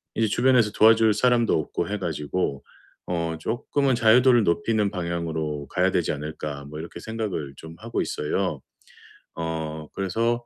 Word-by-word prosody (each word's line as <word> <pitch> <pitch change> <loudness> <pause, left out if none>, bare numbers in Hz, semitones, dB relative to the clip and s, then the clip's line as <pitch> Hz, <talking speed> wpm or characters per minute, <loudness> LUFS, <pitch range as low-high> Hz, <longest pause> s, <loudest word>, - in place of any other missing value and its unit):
이제 110 -1 +2
주변에서 120 -2 +3
도와줄 110 0 +5
사람도 120 +1 +3
없고 75 - -3
해 105 - -1
가지고 80 -3 -2 0.4
어 85 -2 -2
'쪼끔은 130 - 0
자유도를 120 +1 +5
높이는 100 +4 +1
방향으로 80 -5 -3
가야 - - +2
되지 - - +1
않을까?' 75 -1 -6
뭐 75 +2 -9
이렇게 85 +2 -8
생각을 105 -11 -4
좀 80 0 -10
하고 115 +1 -3
있어요. 75 0 -2 0.8
어 80 -2 -4
그래서 115 +5 -1
90 Hz, 325 characters per minute, -25 LUFS, 80-115 Hz, 0.8 s, 도와줄